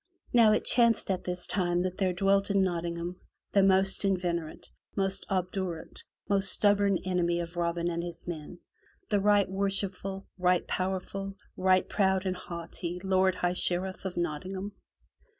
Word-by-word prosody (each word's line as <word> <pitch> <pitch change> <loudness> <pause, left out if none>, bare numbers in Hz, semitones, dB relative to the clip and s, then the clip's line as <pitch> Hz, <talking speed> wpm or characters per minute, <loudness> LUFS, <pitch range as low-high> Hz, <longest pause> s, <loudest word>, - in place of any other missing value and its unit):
Now 230 -3 +6
it 215 - +1
chanced 235 -4 +3
at 185 - -3
this 180 0 -2
time 175 -2 0
that 185 0 -4
there 190 -2 +2
dwelt 195 +2 +2
in 200 -1 +3
Nottingham 170 0 -3 0.3
the 200 - +4
most 190 0 +4
inveterate, 175 -4 -1 0.3
most 195 -1 -1
obdurate, 185 -3 -3 0.3
most 195 -2 +2
stubborn 200 -2 +3
enemy 175 -2 +1
of 170 0 -5
Robin 170 0 -1
and 170 -1 -1
his 170 -1 -8
men, 170 0 -6 0.5
the 205 - +2
right 205 0 +4
worshipful, 195 0 -2
right 180 0 +2
powerful, 190 +1 -3 0.2
right 185 0 +3
proud 190 -2 +1
and 185 -1 0
haughty 170 0 -5
Lord 190 -1 +2
High 180 -1 0
Sheriff 180 +1 +1
of 190 - -4
Nottingham. 185 +4 -3
185 Hz, 150 wpm, -29 LUFS, 175-195 Hz, 0.5 s, Now